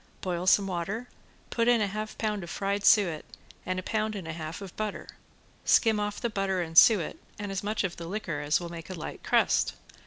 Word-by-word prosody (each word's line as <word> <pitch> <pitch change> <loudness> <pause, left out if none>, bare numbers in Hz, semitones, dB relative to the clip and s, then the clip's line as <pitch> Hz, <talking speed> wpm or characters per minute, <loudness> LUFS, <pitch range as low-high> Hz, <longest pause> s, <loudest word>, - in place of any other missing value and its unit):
Boil 180 -1 -2
some 200 +1 +5
water, 195 +6 -3 0.4
put 230 0 +1
in 240 -1 +5
half 215 +1 -2
a - - -21
pound 210 -3 -2
of 170 - -8
fried 200 +2 -2
suet 175 -9 +4 0.4
and 185 0 -1
a 185 - -3
pound 215 +2 -1
and 185 -5 -6
a 165 - -4
half 160 0 -6
of 195 -3 -9
butter. 215 -1 -4 0.6
Skim 220 -2 +4
off 205 0 -2
the 235 - 0
butter 195 -4 -1
and 165 -2 -4
suet 190 -1 +6 0.2
and 205 -1 -5
as 195 -1 -2
much 210 +2 -1
of 185 -3 -3
the 170 - -7
liquor 180 -6 -3
as 150 +1 +1
will 175 -1 -6
make 170 0 -8
a 185 - -5
light 160 - -7
crust. - - +2
195 Hz, 220 wpm, -28 LUFS, 170-215 Hz, 0.6 s, suet